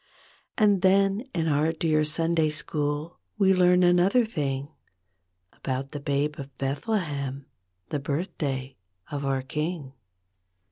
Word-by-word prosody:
And 205 -5 +4
then 195 +5 +3
in 165 -3 -1
our 150 +1 +2
dear 155 -2 +1
Sunday 165 +1 +1
School 150 +1 -2 0.2
We 195 -2 +5
learn 180 0 +4
another 180 +7 +4
thing 145 -7 -3 0.8
About 135 +1 -4
the 145 - -5
Babe 145 +1 -1
of 135 -1 -9
Bethlehem— 140 - -2 0.4
The 150 - -1
birthday 140 -3 -3 0.3
of 145 -1 -3
our 135 -1 0
King. 150 0 -3
155 Hz, 120 wpm, -26 LUFS, 140-180 Hz, 0.8 s, We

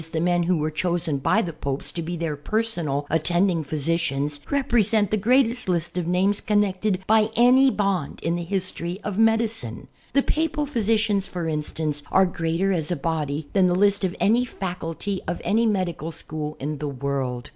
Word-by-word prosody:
the 160 - 0
men 175 +1 +2
who 175 +1 +1
were 155 0 -1
chosen 170 -3 -1
by 220 +11 +2
the 170 - -4
Popes, 140 0 -4
to 170 - -4
be 170 +2 -4
their 165 -2 -2
personal 155 -4 -1
attending 170 +2 +1
physicians, 145 -1 -1
represent 225 -7 +2
the - - +3
greatest 240 +1 +2
list 170 -2 -1
of 180 -2 -2
names 190 +3 +2
connected 205 -2 0
by 220 +1 +4
any 255 +3 +6
bond 195 - -1
in 170 - 0
the 175 - -3
history 180 -1 -3
of 210 0 -3
medicine. 225 - +1 0.3
The 275 +1 +3
Papal 310 -1 0
physicians, 215 -6 +1
for 175 -2 -4
instance, 150 -1 -2
are 190 - +5
greater 175 +2 -1
as 160 -4 -1
a 175 - 0
body 150 -1 -2
than 190 -2 +4
the 175 - +2
list 200 +1 +3
of 185 -1 -1
any 230 +5 +3
faculty 190 -3 -4
of 175 - -2
any 225 +2 +3
medical 180 -6 -1
school 155 -1 -6
in 145 +1 -4
the 150 0 -3
world. 135 -2 -3
180 Hz, 180 wpm, -24 LUFS, 155-210 Hz, 0.3 s, any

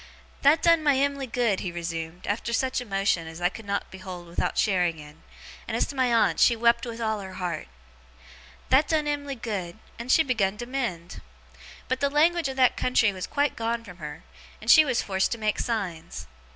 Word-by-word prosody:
'That 285 +3 +4
done 335 -1 +5
my 290 -2 +3
Em'ly 280 -1 0
good,' 230 -4 0
he 180 - -4
resumed, 165 0 -5
after 220 +3 -2
such 255 +2 0
emotion 195 -6 0
as 160 +1 -9
I 175 0 +2
could 225 +3 -11
not 200 0 -2
behold 185 -2 -8
without 170 0 -2
sharing 180 -5 +2
in; 150 +1 -13 0.5
and - - -2
as - - +2
to 285 - -8
my 255 -2 +2
aunt, 230 -1 +3
she 240 - +5
wept 235 +1 +2
with 230 0 -6
all 220 -2 -1
her 190 -1 -8
heart; 175 -4 -4 1.0
'that 275 +4 +4
done 310 -2 +1
Em'ly 285 -1 -2
good, 205 -6 -5 0.2
and 240 +2 -2
she 320 - +6
begun 210 -7 0
to 240 - -5
mend. 235 -10 -4 0.7
But, 260 0 -1
the 280 - +1
language 320 +2 +3
of 265 - -4
that 255 -2 +4
country 225 -4 +2
was 185 -1 -5
quite 285 -1 0
gone 230 0 -2
from 180 -5 -12
her, 150 -1 -8 0.4
and 220 +2 +2
she 315 - +9
was 255 -5 0
forced 190 -1 0
to - - -5
make 215 -1 -1
signs. 190 -9 -3
225 Hz, 205 wpm, -26 LUFS, 185-260 Hz, 1.0 s, she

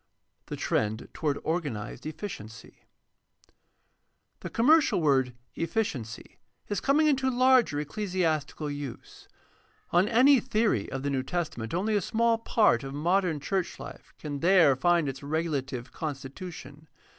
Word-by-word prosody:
The - - -5
trend 110 +1 -1
toward 145 -3 -1
organized 150 -9 -3
efficiency. 115 - -8 0.7
— - - -47
The - - -6
commercial 295 - +4
word 135 -5 +2 0.2
"efficiency" 155 - -3 0.3
is 205 - -1
coming 295 +3 +3
into 265 -3 +2
larger 255 - +4
ecclesiastical 155 -3 -2
use. 145 -4 -8 0.6
On 175 +4 +4
any 255 +4 +6
theory 215 - 0
of 135 0 -4
the 140 - -1
New 135 -1 0
Testament 155 -5 -3
only 210 +4 0
a 205 - +2
small 230 +4 +1
part 215 - +3
of 135 +1 -6
modern 175 +1 +1
church 185 +5 -2
Hfe - - -9 0.2
can 145 -2 -5
there 170 -4 +5
find 170 +2 +2
its 135 -1 -5
regulative 140 -4 -3
constitution. 150 +1 -7
160 Hz, 130 wpm, -28 LUFS, 140-205 Hz, 0.7 s, any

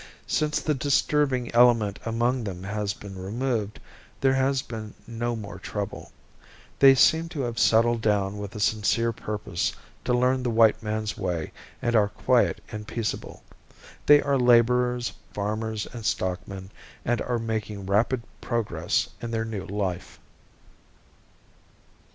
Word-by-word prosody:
Since 150 0 0
the 155 - +1
disturbing 140 -2 +1
element 115 -4 +4
among 120 +2 0
them 95 -3 -5
has 105 +1 -2
been 100 -2 -9
removed 110 +1 -2 0.4
there 135 -1 +3
has 135 0 +1
been 110 -5 -7
no 120 +1 -3
more 100 -4 -7
trouble. 100 0 -5 0.7
They 135 -1 +8
seem 160 +5 +4
to 150 - -4
have 120 -3 -3
settled 115 +1 +4
down 105 -2 +1
with 100 -1 -7
a - - -5
sincere 110 +2 +2
purpose 105 -5 -3 0.3
to 125 - +1
learn 130 +1 +2
the 125 - -1
white 115 -1 +4
man's 110 -1 -3
way 85 -4 -2 0.3
and 120 0 +1
are 105 -2 +5
quiet - - +2
and 105 0 -6
peaceable. 115 -3 -4 0.6
They 145 0 +7
are 140 -1 +1
laborers, 125 0 +3 0.2
farmers 110 +1 -2
and 115 -2 -7
stockmen 95 0 -3 0.3
and 120 0 +1
are 120 -1 -1
making 110 -3 -3
rapid 115 +5 +1 0.2
progress 115 -3 -1
in 120 - -4
their 115 -1 -1
new 105 -4 -5
life. 95 -3 -3
115 Hz, 140 wpm, -26 LUFS, 105-125 Hz, 0.7 s, They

